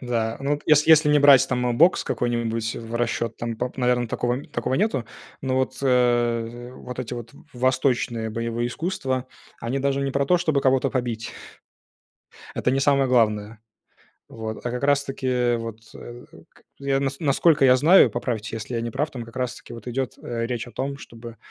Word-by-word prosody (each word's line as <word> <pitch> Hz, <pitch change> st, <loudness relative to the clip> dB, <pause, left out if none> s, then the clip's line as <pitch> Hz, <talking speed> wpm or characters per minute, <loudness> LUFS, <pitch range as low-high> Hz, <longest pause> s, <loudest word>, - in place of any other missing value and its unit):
Да, 115 Hz, -3 st, -2 dB
ну, 140 Hz, +1 st, -2 dB
вот 145 Hz, -, -8 dB
ес 150 Hz, -1 st, +5 dB
если 155 Hz, -1 st, +6 dB
не 150 Hz, 0 st, +5 dB
брать 140 Hz, -2 st, +7 dB
там 125 Hz, -1 st, 0 dB
бокс 170 Hz, +4 st, +5 dB
какой-нибудь 115 Hz, -2 st, -1 dB
в 115 Hz, 0 st, -7 dB
расчет, 115 Hz, -1 st, -2 dB
там, 115 Hz, -1 st, -4 dB
пап 125 Hz, +2 st, -4 dB
наверное, 125 Hz, -2 st, +1 dB
такого 125 Hz, +5 st, -2 dB
такого 120 Hz, +2 st, -2 dB
нету. 180 Hz, -, 0 dB, 0.4 s
Но 130 Hz, -1 st, -1 dB
вот, 130 Hz, 0 st, -1 dB
э, 120 Hz, -2 st, +1 dB
вот 125 Hz, -1 st, -9 dB
эти 125 Hz, -1 st, -4 dB
вот 120 Hz, -1 st, -8 dB, 0.2 s
восточные 125 Hz, -2 st, 0 dB
боевые 115 Hz, +1 st, -2 dB
искусства, 130 Hz, -3 st, -3 dB, 0.3 s
они 120 Hz, +4 st, -2 dB
даже 140 Hz, 0 st, 0 dB
не 135 Hz, -, -1 dB
про 140 Hz, +1 st, 0 dB
то, 180 Hz, -, +4 dB
чтобы 155 Hz, -5 st, +1 dB
кого-то 135 Hz, 0 st, +2 dB
побить. 120 Hz, -3 st, -3 dB, 1.2 s
Это 125 Hz, -, 0 dB
не 135 Hz, -, +1 dB
самое 140 Hz, -1 st, +3 dB
главное. 110 Hz, -3 st, +1 dB, 0.7 s
Вот, 110 Hz, +1 st, -7 dB
а 120 Hz, -, -1 dB
как 125 Hz, -, -4 dB
раз-таки, 140 Hz, -2 st, 0 dB
э, 125 Hz, -1 st, +1 dB
вот, 115 Hz, -1 st, -6 dB, 0.2 s
э, 120 Hz, +1 st, -11 dB, 0.2 s
к -, -, -25 dB, 0.2 s
я 140 Hz, -1 st, 0 dB
нас 135 Hz, 0 st, -2 dB
насколько 150 Hz, 0 st, +3 dB
я 125 Hz, -1 st, +7 dB
знаю, 165 Hz, +8 st, +6 dB
поправьте, 115 Hz, -2 st, -3 dB
если 110 Hz, +2 st, -6 dB
я 115 Hz, -, -1 dB
не 115 Hz, -, -3 dB
прав, 150 Hz, +6 st, -2 dB
там 125 Hz, -4 st, -6 dB
как 115 Hz, 0 st, -14 dB
раз-таки 125 Hz, -1 st, -5 dB
вот 115 Hz, 0 st, -10 dB
идет, 130 Hz, +1 st, -2 dB
э, 115 Hz, -1 st, -4 dB
речь 120 Hz, -2 st, -3 dB
о -, -, -11 dB
том, 140 Hz, +2 st, -4 dB
чтобы 115 Hz, -3 st, -11 dB
125 Hz, 185 wpm, -24 LUFS, 115-135 Hz, 1.2 s, брать